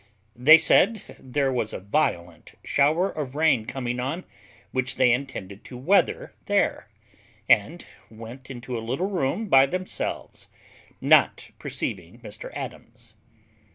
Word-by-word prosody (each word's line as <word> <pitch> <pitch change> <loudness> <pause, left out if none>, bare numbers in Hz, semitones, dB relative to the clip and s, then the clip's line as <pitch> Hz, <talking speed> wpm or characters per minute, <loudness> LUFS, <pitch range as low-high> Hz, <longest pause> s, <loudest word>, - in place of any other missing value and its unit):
They 150 +7 +8
said 195 +6 +3 0.2
there 135 +1 -1
was 115 -3 -2
a - - -5
violent 90 - -2
shower 155 +7 +1
of 140 -3 -6
rain 145 -8 +2
coming 125 -2 -4
on, 140 +9 -3 0.5
which 130 0 -2
they 130 -1 +4
intended 115 -6 -4
to 125 - -10
weather 180 +11 +1
there, - - 0 0.6
and - - +2 0.2
went 115 +4 -11
into 125 -1 -7
a 115 - -3
little 135 - -3
room 180 +4 -1
by 135 -6 +6
themselves, 185 +5 -5 0.5
not - - +3
perceiving - - -5
Mr - - -9
Adams. - - -9
130 Hz, 125 wpm, -24 LUFS, 120-155 Hz, 0.6 s, They